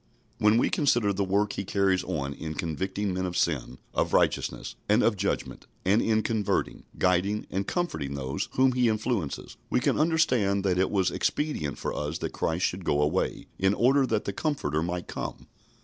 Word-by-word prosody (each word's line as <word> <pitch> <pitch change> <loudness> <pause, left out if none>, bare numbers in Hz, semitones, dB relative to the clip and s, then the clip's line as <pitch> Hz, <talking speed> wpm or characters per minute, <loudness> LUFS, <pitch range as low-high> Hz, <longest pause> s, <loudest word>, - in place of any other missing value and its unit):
" - - -37
When 105 +1 +5
we - - +2
consider 120 -8 +2
the 100 +1 0
work 100 +2 +1
He 100 - -3
carries 95 -1 +1
on 70 -6 -2
in 80 +2 -6
convicting 95 +5 -2
men 95 0 -1
of 90 - -3
sin, 65 -6 0 0.2
of - - 0
righteousness, - - +1 0.2
and 105 +3 +4
of 115 - +3
judgment, 100 +1 -3 0.2
and 100 +5 +4
in 110 -1 +2
converting, 110 -3 -1
guiding, 95 +3 +1
and 95 +1 -2
comforting 80 - -2
those 70 +1 -3
whom 130 0 +4
He 125 -2 +2
influences, 110 - -2
we - - +2
can - - +1
understand 125 - +2
that 90 -2 +1
it 95 - +2
was 95 -3 +1
expedient 145 - -1
for - - -3
us 75 +2 -3
that - - -4
Christ 85 +3 0
should 90 +1 -2
go 75 - +1
away, 75 +5 0
in 95 +2 +3
order 135 +4 +4
that 110 -3 0
the 100 - -2
Comforter 85 - -1
might 90 +1 -3
come. - - -6
95 Hz, 190 wpm, -27 LUFS, 85-110 Hz, 0.2 s, When